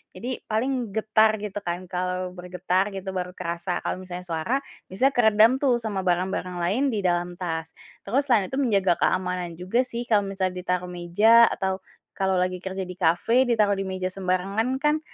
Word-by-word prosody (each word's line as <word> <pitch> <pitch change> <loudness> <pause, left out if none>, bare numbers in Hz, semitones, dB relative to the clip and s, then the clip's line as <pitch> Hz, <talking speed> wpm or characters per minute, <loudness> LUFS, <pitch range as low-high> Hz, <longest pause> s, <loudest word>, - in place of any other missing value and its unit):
Jadi 250 +2 -4
paling 240 0 -1
getar 220 0 +4
gitu 205 -1 -5
kan, 175 0 -3
kalau 180 0 -2
bergetar 180 +2 -1
gitu 190 0 -5
baru 180 0 -3
kerasa 170 +1 -3
kalau - - -2
misalnya 180 0 -7
suara 165 +7 -2 0.4
biasanya 260 +9 +2
keredam 220 -1 +5
tuh 255 -4 +3
sama 215 -4 -3
barang-barang 180 0 -1
lain 200 +10 +1
di 210 - 0
dalam 175 0 0
tas. 165 -2 -3 0.3
Terus 270 +8 0
selain 220 -7 +3
itu 265 - -3
menjaga 200 -9 +3
keamanan 180 -2 0
juga 185 +7 -1
sih, 240 -1 -4
kalau 210 -3 +4
misal 190 -1 -1
ditaruh 180 0 -3
meja 210 +7 +5
atau 190 -1 -2 0.4
kalau 190 -1 +2
lagi 185 0 0
kerja 190 +1 -4
di 180 0 -9
kafe, 225 +10 +3
ditaruh 210 -4 +2
di 195 - -3
meja 185 0 -3
sembarangan 195 +6 -1
kan 300 +3 +1
190 Hz, 175 wpm, -25 LUFS, 180-220 Hz, 0.4 s, keredam